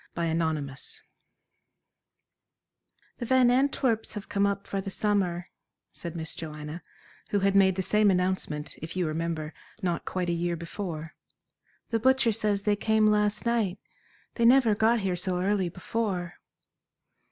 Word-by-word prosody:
Chapter 170 -1 0
XXV 155 -4 -2 2.2
"The 240 - -3
Van 255 -1 +5
Antwerps 255 -4 +1
have 210 - -6
come 200 0 +2
up 200 0 -2
for 195 - -3
the 195 - -5
summer," 190 -4 0 0.5
said 170 -1 -6
Miss 160 -2 -4
Joanna, 155 +1 -7 0.5
who 205 - +1
had 195 0 +2
made 190 -2 +5
the 190 - -1
same 210 +3 +4
announcement, 180 -5 -1
if 160 +3 -7
you 185 -1 +1
remember, 160 -1 -3 0.3
not 175 -2 -1
quite 180 -2 -2
a - - +1
year 170 0 -1
before. 165 -2 -6 0.8
"The 225 - +2
butcher 260 0 +4
says 210 -2 0
they 210 0 +2
came 220 +1 +2
last 210 +1 +2
night. 225 -5 +1 0.6
They 235 - +1
never 245 -2 +6
got 220 +2 +3
here 190 -2 0
so 180 0 -1
early 190 -1 +1
before." 185 -1 -3
190 Hz, 145 wpm, -28 LUFS, 170-215 Hz, 2.2 s, never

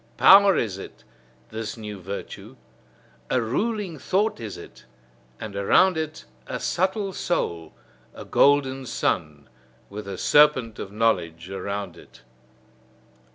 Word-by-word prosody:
Power 195 -1 +7
is 100 -4 -2
it, - - -11 0.5
this 110 +1 -5
new 105 -2 -7
virtue; 100 +3 -8 0.7
a - - +2
ruling 185 - -2
thought 200 - 0
is 110 -3 -6
it, 65 - -13 0.5
and 105 -2 -7
around 130 - +4
it 155 - -5 0.2
a - - -4
subtle 190 +2 -1
soul: 85 - -2 0.4
a - - -9
golden 135 -2 +2
sun, 75 -8 -2 0.4
with 105 +1 -7
the 100 -1 -6
serpent 130 -6 +3
of 95 - -6
knowledge 90 -6 -1
around 100 -1 -5
it. - - -17
115 Hz, 120 wpm, -24 LUFS, 100-160 Hz, 0.7 s, Power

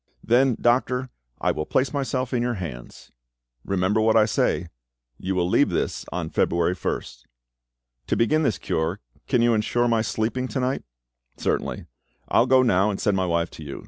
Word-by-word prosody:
"Then, 125 +1 +3
doctor, 125 +1 +1 0.3
I - - +1
will 75 - -4
place 130 +1 +1
myself 130 -2 -2
in 120 - +1
your 120 0 -1
hands." 75 - -8 0.5
"Remember 100 +3 +1
what 110 +1 +4
I 110 - +6
say. 90 -5 0 0.5
You 95 +1 -2
will 90 -1 +1
leave - - +3
this - - -2
on - - -4
February 85 +1 +1
1st." - - -5 0.8
"To - - 0
begin 155 +7 +2
this 115 - +1
cure, 80 +3 -2 0.3
can 120 - +2
you 120 0 +4
ensure 120 +2 +1
my 115 -1 +2
sleeping 115 +3 -1
to 130 - -3
night?" 130 +1 -1 0.6
"Certainly. - - -2 0.4
I - - +3
will 120 - +4
go 130 0 +5
now, 100 -4 +3
and 100 - -3
send 105 - +1
my 95 -1 0
wife 85 -1 0
to 80 - -10
you. 70 -2 -7
110 Hz, 180 wpm, -24 LUFS, 90-125 Hz, 0.8 s, I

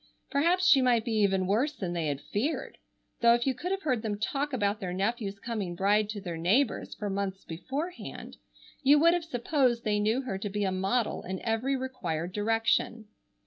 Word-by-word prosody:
Perhaps 340 +6 +2
she 280 -7 +7
might 240 -3 +3
be 235 - -2
even 195 -3 +2
worse 235 +11 +1
than 185 -10 -4
they 165 -3 -1
had 145 -1 -2
feared, 270 +11 -3 0.4
though 235 0 +6
if 240 - -1
you 265 - +2
could 295 +9 -5
have 390 +1 -2
heard 255 -7 0
them 215 -2 -2
talk 280 +7 -2
about 210 -5 0
their 185 -4 -4
nephew's 200 +1 -2
coming 200 -5 -4
bride 205 +3 +2
to 215 -1 -4
their 175 -4 -5
neighbors 220 +10 +1
for 210 - -4
months 195 -1 -3
beforehand, 275 - -6 0.4
you 285 +1 +6
would 335 +3 +5
have 350 -1 0
supposed 250 -4 0
they 210 -2 +1
knew 220 +6 +1
her 195 -7 -4
to 205 - -3
be 205 +1 -2
a 190 - +1
model 195 +5 0
in 185 +1 -5
every 235 +4 0
required 180 -11 -3
direction. 225 +1 0
220 Hz, 195 wpm, -29 LUFS, 195-260 Hz, 0.4 s, she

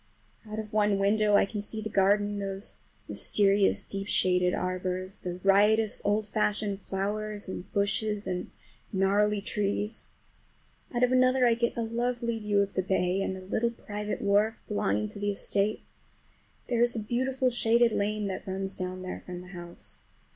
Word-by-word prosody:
Out 215 - -5
of 215 0 -6
one 210 -2 +3
window 210 +1 +3
I - - +5
can 205 +1 -5
see 220 +1 -3
the 215 - -3
garden, 205 0 +2
those 195 +1 -4 0.3
mysterious 200 -1 +2
deep 195 0 -5
shaded 180 -2 +3
arbors, 185 +1 -3
the 180 0 -5
riotous 210 +2 +4
old 205 +1 +1
fashioned 210 -1 0
flowers, 205 +2 -3
and 185 +1 -7
bushes 205 +1 0
and 180 -1 -3 0.4
gnarly 205 +2 +2
trees. 205 +1 -1 0.8
Out 240 0 0
of 250 - +4
another 255 0 +4
I 235 - +5
get 235 +1 -1
a 235 - 0
lovely 235 0 -1
view 205 -1 +2
of 200 - -6
the 185 - +1
bay 190 0 +1
and 190 -1 -2
a - - -9
little 220 +4 0
private 210 -2 -5
wharf 205 +2 +2
belonging 105 - 0
to - - -9
the 205 0 0
estate. 200 +1 -1 0.8
There 235 -2 +1
is 240 0 +3
a - - -1
beautiful 255 +4 0
shaded 235 0 +4
lane 210 0 -1
that 190 -1 -4
runs 190 0 -3
down 185 0 -4
there 185 - -5
from 180 -1 -8
the 180 - -12
house. 170 - -7
205 Hz, 170 wpm, -29 LUFS, 195-220 Hz, 0.8 s, I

